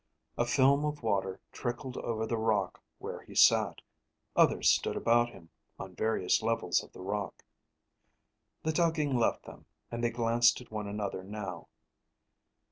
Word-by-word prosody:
A 120 - 0
film 140 +3 +4
of 150 -3 -3
water 95 -3 -1
trickled 125 +1 -4
over 110 -1 -2
the 115 - -1
rock 110 -4 0 0.2
where - - -7
he - - -14
sat. - - +4 0.5
Others - - +5
stood - - 0
about 120 +1 +3
him, 85 -7 -15 0.3
on 95 -1 -8
various 110 -1 +1
levels 110 -6 0
of - - -15
the - - -12
rock. 100 -1 -4 1.2
The 160 - +1
tugging 155 -4 +1
left 120 -2 +1
them, - - -13 0.2
and 120 0 -4
they 120 - +3
glanced 115 0 +3
at 125 - -14
one 105 -1 -4
another 100 -2 -4
now. 95 -3 -6
115 Hz, 150 wpm, -31 LUFS, 100-120 Hz, 1.2 s, Others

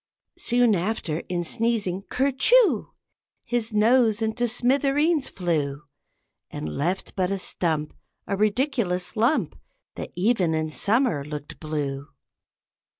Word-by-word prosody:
Soon 240 -2 +3
after, 175 -4 -1
in 175 -1 -1
sneezing, 210 -2 -1
"ker 275 +2 +1
choo," 475 - +4 0.5
His 240 -2 -1
nose 220 0 +3
into 225 +2 0
smithereens 275 +5 +2
flew, 150 -6 -2 0.7
And - - -5
left 175 +6 -2
but 185 -2 0
a 195 - -1
stump, 160 -5 -1 0.3
A 200 - -1
ridiculous 215 -3 0
lump, 230 - +1 0.4
That - - -6
even 180 -3 +2
in 155 0 -2
summer 205 - +1
looked 150 0 -8
blue. 145 -3 -3
205 Hz, 115 wpm, -25 LUFS, 165-245 Hz, 0.7 s, choo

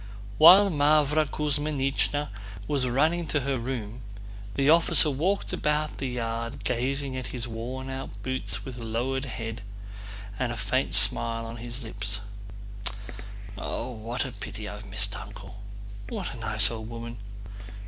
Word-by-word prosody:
While 190 +5 +9
Mávra 150 0 +3
Kuzmínichna 145 -1 0 0.4
was 140 -4 +1
running 155 +7 +2
to 145 0 0
her 135 -1 -1
room 120 -2 -4 0.5
the 135 0 +2
officer 160 -1 +7
walked 180 +9 0
about 150 0 0
the 135 - -1
yard 115 -1 -3
gazing 135 +2 -1
at 130 -2 -4
his 120 -1 -4
worn 120 +3 -5
out 135 0 -5
boots 130 0 -2
with 125 -2 -7
lowered 120 +4 -2
head 115 -1 -5 0.8
and 125 -2 0
a 120 - -4
faint 110 +6 0
smile 115 -1 +3
on 115 +1 -7
his 120 +2 -5
lips. 105 -1 -4 1.3
"What 120 +1 -3
a 130 - -5
pity 105 0 -7
I've 105 0 -8
missed 100 0 +2
Uncle! 100 - -9 0.5
What - - -4
a - - -9
nice 110 -2 +2
old 110 -1 -6
woman! 115 -1 -7
125 Hz, 140 wpm, -27 LUFS, 115-145 Hz, 1.3 s, While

